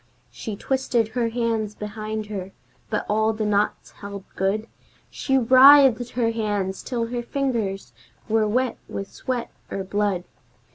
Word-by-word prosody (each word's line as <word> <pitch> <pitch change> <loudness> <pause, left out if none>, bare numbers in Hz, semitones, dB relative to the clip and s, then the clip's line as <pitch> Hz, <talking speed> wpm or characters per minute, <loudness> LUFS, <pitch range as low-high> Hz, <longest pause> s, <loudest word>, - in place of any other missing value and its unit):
She 215 - -6
twisted 245 -1 0
her 235 0 0
hands 225 -3 -1
behind 215 +1 -5
her, 195 -2 -6 0.4
but - - -1
all 220 +1 +2
the 215 0 -2
knots 210 0 0
held 200 -1 -8
good! 200 +3 0 0.5
She 270 -1 0
writhed 260 -1 +7
her 235 -2 +1
hands 205 -4 -2
till 240 -3 -2
her 240 0 -2
fingers 230 - -2 0.3
were 220 -1 +2
wet 250 +4 0
with 195 0 -6
sweat 250 -2 -3 0.2
or 195 - -3
blood! 200 -2 0
220 Hz, 140 wpm, -24 LUFS, 205-245 Hz, 0.5 s, writhed